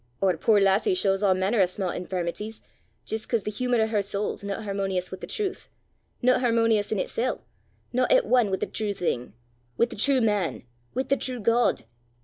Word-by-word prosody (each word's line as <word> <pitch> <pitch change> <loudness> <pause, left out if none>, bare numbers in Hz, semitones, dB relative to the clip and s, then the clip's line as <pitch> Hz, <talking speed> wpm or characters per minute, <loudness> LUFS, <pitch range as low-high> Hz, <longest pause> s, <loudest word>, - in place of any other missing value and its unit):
Oor 185 -2 +3
puir 210 +6 +3
lassie 195 - +3
shaws 195 - +1
a' 195 -2 +4
mainner 195 +4 +1
o' 185 - +5
sma' 185 +1 -3
infirmities 185 +4 -4 0.5
jist 220 0 -3
'cause 230 -4 +1
the 210 - -3
humour 245 +2 0
o' - - +4
her 220 -2 0
sowl 200 +1 -2
's - - -13
no 200 -1 -3
hermonious 195 -3 -2
wi' 185 - -6
the - - -6
trowth, 400 -2 -3 0.6
no 255 +1 +4
hermonious 230 -4 +2
in 215 - +1
itsel', 240 +6 -2 0.5
no 255 +1 +3
at - - +4
ane 245 -5 +3
wi' 190 - 0
the - - -2
true 210 -2 -3
thing 125 - -2 0.4
wi' 235 - +4
the 240 - -9
true 265 +5 +3
man 210 -7 0 0.3
wi' 260 - +1
the 275 - +1
true 255 -2 -3
God. 230 - +2
210 Hz, 200 wpm, -26 LUFS, 195-240 Hz, 0.6 s, o